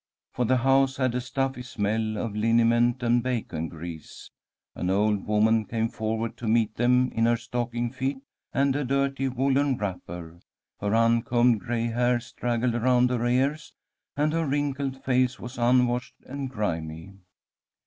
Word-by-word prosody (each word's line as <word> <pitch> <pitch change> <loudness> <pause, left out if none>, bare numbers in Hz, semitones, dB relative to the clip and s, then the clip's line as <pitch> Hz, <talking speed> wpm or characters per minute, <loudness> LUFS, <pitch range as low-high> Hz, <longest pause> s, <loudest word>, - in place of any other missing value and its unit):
For 125 - 0
the 130 +2 +3
house 135 +1 +3
had 130 -2 +1
a 125 - -1
stuffy 135 0 -2
smell 110 -2 -2
of 110 -1 -3
liniment 115 +2 +3
and 120 0 +3
bacon 110 -10 -3
grease. 80 -1 -9 0.4
An 90 - -3
old 105 +1 +1
woman 110 +1 +3
came 115 +1 -2
forward 110 0 -3
to 120 - -5
meet 110 -1 +2
them 125 +2 +2
in 115 0 +1
her 120 0 +3
stocking 120 0 -3
feet 130 +1 -2 0.3
and 135 0 +1
a 145 - 0
dirty 135 +1 0
woollen 135 +1 +1
wrapper. 85 -4 -6 0.4
Her 105 +1 0
uncombed 115 0 +3
gray 115 +3 -2
hair 120 +1 +1
straggled 120 0 -2
around 125 +1 +3
her 120 -2 -1
ears, 135 +5 0 0.4
and 150 +1 +1
her 165 -1 0
wrinkled 140 -1 -2
face 130 0 +1
was 125 +1 -8
unwashed 125 0 +2
and 135 0 -5
grimy. 80 -6 -4
120 Hz, 150 wpm, -26 LUFS, 110-130 Hz, 0.4 s, the